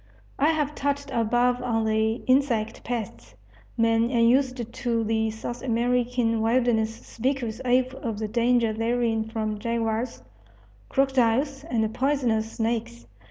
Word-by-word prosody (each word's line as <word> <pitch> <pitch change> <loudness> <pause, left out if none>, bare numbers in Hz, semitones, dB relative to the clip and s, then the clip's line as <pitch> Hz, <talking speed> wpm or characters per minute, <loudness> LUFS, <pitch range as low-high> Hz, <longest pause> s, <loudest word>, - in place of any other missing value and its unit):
I 285 - +4
have 300 -2 0
touched 285 -1 -2
above 245 +2 +1
on 225 -3 0
the 220 0 +2
insect 250 -5 +1
pests. 120 - -5 0.4
Men 230 0 +3
unused 245 0 +2
to 235 -3 -1
the 220 0 0
South 240 +2 -6
American 240 -1 +1
wilderness 225 -1 +1
speak 260 +3 -2
with 225 +1 -4
awe 255 +1 +4 0.2
of 225 -3 -3
the 215 0 -3
danger 235 0 +2
therein 225 0 0
from 215 -2 -3
jaguars, 230 +1 -2 0.7
crocodiles, 270 +1 +1
and 220 -7 -1
poisonous 245 -5 0
snakes. 220 - -2
235 Hz, 125 wpm, -25 LUFS, 220-250 Hz, 0.7 s, I